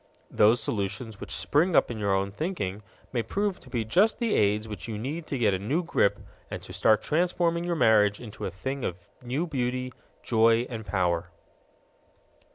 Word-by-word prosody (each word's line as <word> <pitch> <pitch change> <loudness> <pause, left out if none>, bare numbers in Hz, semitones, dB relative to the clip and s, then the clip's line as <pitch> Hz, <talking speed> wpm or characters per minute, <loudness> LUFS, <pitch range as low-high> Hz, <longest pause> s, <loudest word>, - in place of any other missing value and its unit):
Those 110 +3 +5
solutions 110 +1 -3
which - - -8
spring 145 - +1
up - - +4
in 110 - -5
your 100 -2 +1
own 100 +1 -1
thinking 105 - -3 0.3
may 120 - +1
prove 200 - -2
to - - -16
be 120 -3 -2
just 195 - +3
the 235 -3 0
aids 105 +1 +2
which 105 +1 -7
you 110 -2 -4
need 150 +9 -4
to 140 - -2
get 110 -5 +3
a 95 - -1
new 140 - 0
grip 100 -11 +2 0.3
and - - -5
to - - -10
start 110 - +3
transforming 170 +1 +1
your 175 -1 0
marriage 105 -7 +4
into 110 -3 -7
a - - -2
thing 130 +9 -5
of 90 - -2 0.2
new 130 +7 -2
beauty, 125 -4 -2 0.3
joy, 115 +1 +3
and 110 -3 -6
power. 90 -3 0
115 Hz, 185 wpm, -27 LUFS, 105-150 Hz, 0.3 s, Those